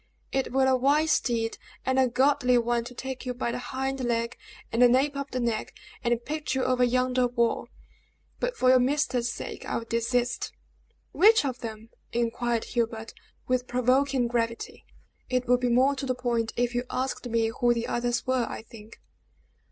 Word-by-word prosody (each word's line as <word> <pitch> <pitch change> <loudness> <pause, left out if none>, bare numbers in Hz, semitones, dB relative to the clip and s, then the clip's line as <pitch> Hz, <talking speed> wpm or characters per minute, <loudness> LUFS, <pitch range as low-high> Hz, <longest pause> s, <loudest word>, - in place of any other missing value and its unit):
"It 270 0 -1
were 265 +1 +3
a 265 0 +4
wise 290 +5 +3
deed 230 -2 -2 0.3
and 260 0 +2
a 260 - +5
godly 250 0 +3
one 235 0 +1
to 250 +1 -9
take 265 +1 -5
you 250 -1 -4
by 240 -1 -2
the 245 - -3
hind 265 +1 -3
leg 235 0 -1 0.4
and 230 - +1
nape 275 +3 +2
of 280 0 -4
the 255 - -3
neck, 235 -3 -2 0.3
and 240 -1 +1
pitch 305 -1 -3
you 260 - +1
over 255 -1 +2
yonder 250 0 +2
wall; 235 -1 0 0.7
but - - -2
for 255 - +3
your 255 0 +7
master's 250 -2 +1
sake - - -7
I - - -2
will 230 - -5
desist." 240 +1 -1 0.6
"Which 435 -3 +5
of 255 -2 -3
them?" 220 -1 -7 0.2
inquired 235 0 0
Hubert, 225 -2 -2 0.3
with 255 0 0
provoking 255 +1 +2
gravity. 230 -1 -3 0.4
"It 250 0 0
would 250 0 +4
be 250 -1 0
more 255 +4 +4
to 270 - -3
the 255 - 0
point 235 -3 -1
if 245 0 0
you 245 0 0
asked 255 -1 -3
me 225 -1 +1
who 240 0 +4
the 235 -1 0
others 240 0 -1
were, 255 -3 +1
I - - -6
think." 220 0 -14
245 Hz, 185 wpm, -27 LUFS, 235-260 Hz, 0.7 s, your